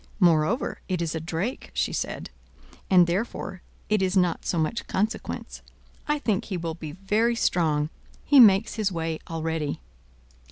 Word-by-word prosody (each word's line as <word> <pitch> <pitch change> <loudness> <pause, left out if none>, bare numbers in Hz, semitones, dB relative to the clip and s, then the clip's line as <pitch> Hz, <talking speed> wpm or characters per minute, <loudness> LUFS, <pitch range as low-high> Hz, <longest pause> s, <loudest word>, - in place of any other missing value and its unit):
Moreover 175 - +2
it 185 -2 -1
is 165 -2 -1
a 160 - -2
drake," 175 +9 -4
she - - 0
said, - - -4 0.6
"and 180 -2 +7
therefore 185 0 -3 0.3
it 210 -2 +2
is 190 +1 +1
not 180 -3 +1
so 175 - 0
much 160 +8 -1
consequence. 215 +4 -3 0.5
I 295 0 +2
think 220 -9 -1
he 190 - -3
will 165 -1 -3
be 155 -2 -8
very 210 +6 +1
strong: 155 -8 +1 0.3
he 285 -1 +6
makes 210 -2 +7
his 210 -3 0
way 165 -2 -3
already." 160 -2 -2
180 Hz, 155 wpm, -26 LUFS, 165-210 Hz, 0.6 s, and